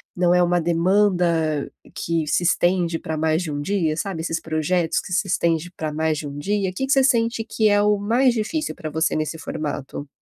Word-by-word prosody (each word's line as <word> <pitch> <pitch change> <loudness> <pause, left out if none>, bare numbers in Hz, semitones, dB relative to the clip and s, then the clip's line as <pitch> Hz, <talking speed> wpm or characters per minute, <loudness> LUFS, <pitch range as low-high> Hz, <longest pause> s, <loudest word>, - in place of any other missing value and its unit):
não 175 -1 +3
é 180 - +4
uma 175 0 +2
demanda 170 -3 +1 0.2
que 165 -1 -1
se 150 - +1
estende 175 -1 +1
pra 160 -1 -5
mais 160 +2 +1
de 160 - -4
um 145 0 -3
dia", 165 -2 0
sabe? 170 0 -3
Esses 165 0 -2
projetos 160 +2 0
que 185 - -7
se 190 +3 +1
estende 170 -2 0
pra 155 -1 -3
mais 160 0 0
de 150 - -5
um 140 - -7
dia? 200 +4 -1
O - - -16
que 265 +8 -3
que - - -2
você 270 -2 +4
sente 230 -3 +2
que 220 -1 +1
é 205 0 +4
o 210 0 +3
mais 240 +5 +2
difícil 275 +8 -2
pra 155 - -6
você 160 +2 0
nesse 155 +1 -2
formato? 145 -3 -5
175 Hz, 215 wpm, -22 LUFS, 160-205 Hz, 0.2 s, é